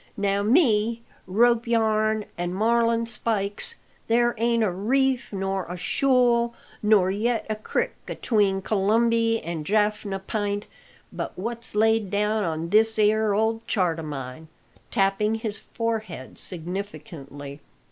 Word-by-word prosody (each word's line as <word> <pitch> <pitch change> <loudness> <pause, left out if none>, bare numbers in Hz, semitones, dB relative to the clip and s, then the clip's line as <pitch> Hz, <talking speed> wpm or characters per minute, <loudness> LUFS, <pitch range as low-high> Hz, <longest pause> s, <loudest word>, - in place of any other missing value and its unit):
Now 200 0 +1
me 230 - +3 0.2
rope 235 +4 +3
yarn 215 -2 +1
an' 175 +1 -3
marlin 230 +2 +2
spikes! 220 - -1 0.3
there 240 +1 +3
ain't 230 0 +2
a 205 - +1
reef, 255 +7 0
nor 195 -1 -2
a 180 +1 -6
shool, 240 +1 +2 0.3
nor 210 -3 +4
yet 225 +3 0
a - - 0
crik 470 - -2 0.2
atween 200 -4 +1
Colombie 225 +3 +2
an' 165 -2 -4
Jafna 210 +1 0
P'int 205 +1 -2 0.5
but - - -5
what's 230 +3 -5
laid 220 -1 +3
down 210 +2 +1
on 165 0 -3
this 220 +3 +3
'ere 215 -1 +3
old 225 +1 0
chart 175 -5 +1
o' - - -3
mine," 145 0 -7 0.4
tapping 210 +1 +1
his 220 -2 -4
forehead 220 - -4
significantly. 165 -6 -6
215 Hz, 125 wpm, -25 LUFS, 195-230 Hz, 0.5 s, nor